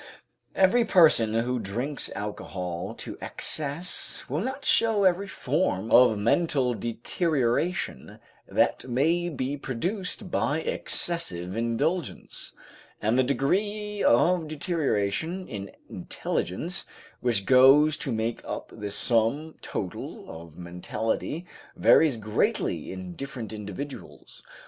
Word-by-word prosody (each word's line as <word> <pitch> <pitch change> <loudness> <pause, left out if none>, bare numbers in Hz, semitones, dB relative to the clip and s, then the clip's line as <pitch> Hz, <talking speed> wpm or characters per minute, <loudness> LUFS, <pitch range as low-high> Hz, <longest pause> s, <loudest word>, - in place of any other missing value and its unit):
Every 195 +6 +5
person 155 - +5
who 120 +2 0
drinks 120 +8 -2
alcohol 90 -4 -5
to - - -8
excess 155 +4 -2
will 145 +5 -1
not 265 +5 -4
show 220 -3 +4
every 190 +1 +3
form 125 - -1
of 120 -3 +7
mental 130 - +2
deterioration 120 - -1 0.3
that - - +1
may 165 +8 +2
be 140 -2 -3
produced 180 - -3
by 155 +3 +1
excessive 95 - -1
indulgence, 130 +9 -2 0.4
and 110 +3 +1
the 130 - +5
degree 205 - 0
of 165 +7 +4
deterioration 155 - -1
in 100 -2 -6 0.2
intelligence 165 - -3 0.3
which 115 -6 +1
goes 135 +4 +7
to 135 - -3
make 115 +1 -1
up - - -6
the 105 -1 -5
sum 120 +9 0
total 90 -3 -5
of 80 -1 -11
mentality 105 - -3 0.3
varies 150 -7 +5
greatly 110 -1 -1
in 95 -1 -7
different 120 -2 -6
individuals. 105 +7 -8
130 Hz, 105 wpm, -27 LUFS, 110-170 Hz, 0.4 s, of